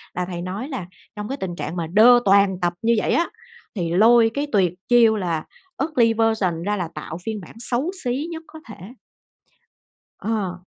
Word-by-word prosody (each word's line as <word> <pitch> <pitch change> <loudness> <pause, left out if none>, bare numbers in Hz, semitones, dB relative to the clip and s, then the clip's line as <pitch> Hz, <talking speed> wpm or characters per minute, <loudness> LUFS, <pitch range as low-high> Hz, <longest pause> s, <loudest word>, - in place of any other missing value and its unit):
là 180 0 -1
thầy 175 -1 -6
nói 200 - -5
là 250 - -5 0.3
trong 210 0 -5
cái 275 - -3
tình 180 -6 -5
trạng 165 +1 -5
mà 165 -2 -3
đơ 230 +7 +6
toàn 195 -1 +4
tập 175 0 +1
như 230 +1 +3
vậy - - 0
á, 340 - +1 0.5
thì 170 -3 -2
lôi 225 +3 +5
cái 285 +1 -2
tuyệt 185 -5 +2 0.2
chiêu 230 -2 +5
là 170 -5 -2 0.4
"ugly 240 -8 +2
version" 215 -7 0
ra, 205 +1 0
là 170 -3 -3
tạo 155 +2 -6
phiên 220 -3 -4
bản 175 - -13
xấu 255 +8 -1
xí 260 +6 -2
nhất 325 0 -7
có 315 - -12
thể. - - -8 1.4
Ờ. 190 -5 -3
210 Hz, 190 wpm, -22 LUFS, 180-240 Hz, 1.4 s, đơ